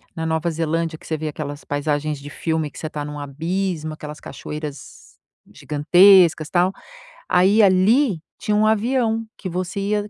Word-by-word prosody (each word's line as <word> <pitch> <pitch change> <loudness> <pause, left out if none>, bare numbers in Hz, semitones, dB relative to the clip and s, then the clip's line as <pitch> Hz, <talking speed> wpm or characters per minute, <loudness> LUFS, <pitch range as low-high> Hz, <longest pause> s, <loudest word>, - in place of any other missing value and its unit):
na 160 - -3
Nova 160 +1 0
Zelândia, 165 0 -2
que - - -17
você 160 - -2
vê 155 +1 -4
aquelas 145 -1 -6
paisagens 145 0 -2
de 145 +1 -9
filme, 160 0 -2
que - - -14
você 155 - -4
tá 150 -1 -5
num 150 0 -6
abismo, 155 +3 -3
aquelas 150 0 -9
cachoeiras 150 -2 -9 0.4
gigantescas, 160 +3 +5
tal, 180 +1 +2 0.6
aí, 190 +5 +4
ali 200 - +3 0.2
tinha 210 - 0
um 215 - +3
avião, 225 +1 +1
que 190 - -6
você 185 +2 -3
ia 205 +1 -1
165 Hz, 160 wpm, -21 LUFS, 150-195 Hz, 0.6 s, gigantescas